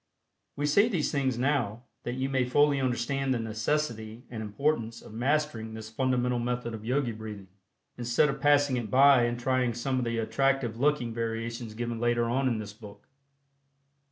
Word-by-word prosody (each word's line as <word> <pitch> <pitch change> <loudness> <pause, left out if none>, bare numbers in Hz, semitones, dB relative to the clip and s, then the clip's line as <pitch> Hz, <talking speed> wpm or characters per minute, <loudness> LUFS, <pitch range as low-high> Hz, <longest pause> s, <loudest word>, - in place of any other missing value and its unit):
We 145 - -1
say 200 +10 +4
these 175 -9 0
things 135 -4 0
now, 125 -4 0 0.2
that 120 - -2
you 130 +1 -1
may 135 -1 +1
fully 140 +2 +3
understand 130 +2 0
the - - -1
necessity 110 0 -2
and 115 -2 -5
importance 115 +1 -1
of - - -13
mastering 120 -3 -1
this 110 0 -8
fundamental 125 0 +1
method 120 -1 -2
of 110 -1 -7
Yogi 125 +1 0
Breathing, 105 -3 -8 0.5
instead 120 +4 +3
of 140 -1 -3
passing 145 -2 +4
it 115 -3 -3
by 135 0 +6
and 120 0 -2
trying 125 -1 +1
some 130 +2 -1
of 125 - -1
the 115 0 -1
attractive 125 0 0
looking 140 -4 +1
variations 115 0 -4
given 120 0 -3
later 120 0 +1
on 130 +3 +1
in 120 -3 +1
this 105 -1 -6
book. 105 -2 -13
120 Hz, 175 wpm, -28 LUFS, 115-135 Hz, 0.5 s, by